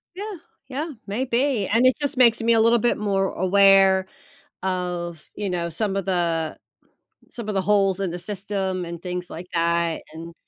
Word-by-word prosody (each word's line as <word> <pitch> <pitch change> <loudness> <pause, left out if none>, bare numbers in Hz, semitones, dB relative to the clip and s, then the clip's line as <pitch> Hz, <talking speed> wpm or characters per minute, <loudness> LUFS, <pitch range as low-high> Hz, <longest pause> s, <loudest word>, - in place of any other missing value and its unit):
Yeah. 415 +2 -5 0.3
Yeah, 290 +5 -4 0.2
maybe. 245 0 0
And 230 +4 +3
it 255 - +4
just 285 0 -1
makes 235 -2 +4
me 235 - +4
a 225 - +4
little 230 +1 +5
bit 240 +2 +2
more 195 -2 0
aware 195 0 +5 0.6
of, 175 -3 -3
you 210 - -3
know, 170 -1 -2
some 195 +4 -2
of 195 - -2
the 170 -4 -1 0.8
some 235 -3 -7
of 210 - -2
the 195 - +1
holes 195 -1 +2
in 190 -3 -1
the 175 - -5
system 190 -1 -3
and 170 0 -7
things 180 -1 -4
like 175 +3 -8
that, 170 0 +1
and, 165 +1 -9
195 Hz, 180 wpm, -23 LUFS, 175-225 Hz, 0.8 s, little